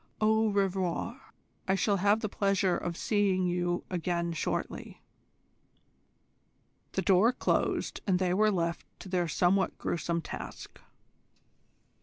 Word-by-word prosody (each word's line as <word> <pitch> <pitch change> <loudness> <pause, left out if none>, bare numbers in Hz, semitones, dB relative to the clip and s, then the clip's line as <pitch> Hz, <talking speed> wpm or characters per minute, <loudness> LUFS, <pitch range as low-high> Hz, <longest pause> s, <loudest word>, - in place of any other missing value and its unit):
Au 220 +1 +3
revoir. 195 +5 -1 0.4
I 190 - +3
shall 200 +1 +1
have 205 +3 +3
the 215 - -1
pleasure 195 -2 +1
of 175 -1 -4
seeing 200 -3 +1
you 175 0 0
again 170 -1 -1
shortly." 160 - -4 1.9
The - - -1
door 200 +4 +5
closed, 255 - -1
and 185 -2 +3
they 180 -1 +1
were 215 +3 +4
left 170 -4 -1
to 190 - -9
their 180 -2 0
somewhat 185 +4 +1
gruesome 170 0 -2
task. 65 - -8
185 Hz, 120 wpm, -30 LUFS, 175-205 Hz, 1.9 s, door